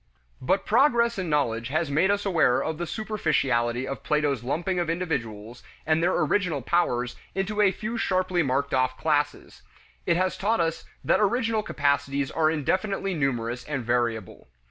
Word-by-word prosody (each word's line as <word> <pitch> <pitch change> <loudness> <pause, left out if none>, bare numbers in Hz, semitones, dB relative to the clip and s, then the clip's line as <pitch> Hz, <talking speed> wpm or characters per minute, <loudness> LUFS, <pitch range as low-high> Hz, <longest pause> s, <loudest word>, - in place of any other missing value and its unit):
But 160 +10 +1
progress 235 -2 +3
in 180 -3 -3
knowledge 120 -6 0
has 155 +2 -1
made 165 +7 +3
us 200 0 0
aware 165 -10 +3
of 160 0 -3
the 175 - -3
superficiality 135 - 0
of 135 - -5
Plato's 150 -5 0
lumping 175 +8 -1
of 170 -2 -1
individuals 120 - -3 0.2
and 155 +1 +2
their 175 +2 +2
original 160 - 0
powers 125 -8 0 0.2
into 205 +2 -1
a 200 -2 +5
few 220 +4 -4
sharply 185 -3 +1
marked 140 0 -1
off 130 0 +1
classes; 145 -2 -1 0.5
it 170 - +3
has 185 +1 0
taught 220 +3 +1
us 165 -1 -1 0.2
that - - +3
original 225 +1 +1
capacities 140 -5 0
are 155 -1 +2
indefinitely 190 +6 -1
numerous 125 -5 -1
and 135 -5 -4
variable. 120 -4 -2
155 Hz, 160 wpm, -26 LUFS, 130-190 Hz, 0.5 s, a